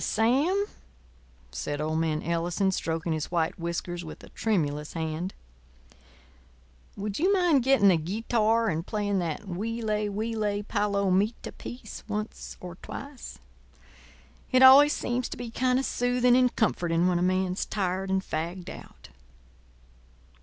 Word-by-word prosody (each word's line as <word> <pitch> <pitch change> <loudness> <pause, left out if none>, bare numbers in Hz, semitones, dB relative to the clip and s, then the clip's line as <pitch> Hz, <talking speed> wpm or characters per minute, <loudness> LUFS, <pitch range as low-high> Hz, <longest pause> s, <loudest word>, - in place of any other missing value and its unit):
"Sam," 285 - +2 0.9
said 145 - -4
old 155 +1 -1
man 160 -1 0
Ellison, 175 +3 0
stroking 165 -2 -2
his 155 -1 -3
white 170 -1 -1
whiskers 170 +1 -3
with 160 - -10
a - - -12
tremulous 150 -9 -1
hand, 165 +3 -3 1.6
"would 205 0 -3
you 370 +5 +3
mind 355 -8 +4
getting 245 -6 +5
the 180 - +5
guitar 220 +6 +1
and 160 0 -1
playing 205 -1 -1
that 165 -4 -2
'Huile, 210 +2 -2
huile, 210 -1 -2
palomita' 200 +1 0
piece 240 -3 -9
once 210 0 -5
or 175 -2 -9
twice? 280 -1 -8 1.1
It 255 0 +5
always 280 +3 +9
seems 245 +1 -2
to - - -6
be 240 -1 -6
kind 255 +1 +1
of 270 - 0
soothing 245 0 +2
and 250 -1 +3
comforting 175 -5 +1
when 180 -1 +2
a - - -1
man's 185 +1 0
tired 190 -1 -2
and 190 0 +1
fagged 170 +3 -4
out." - - -13
200 Hz, 135 wpm, -27 LUFS, 170-230 Hz, 1.6 s, always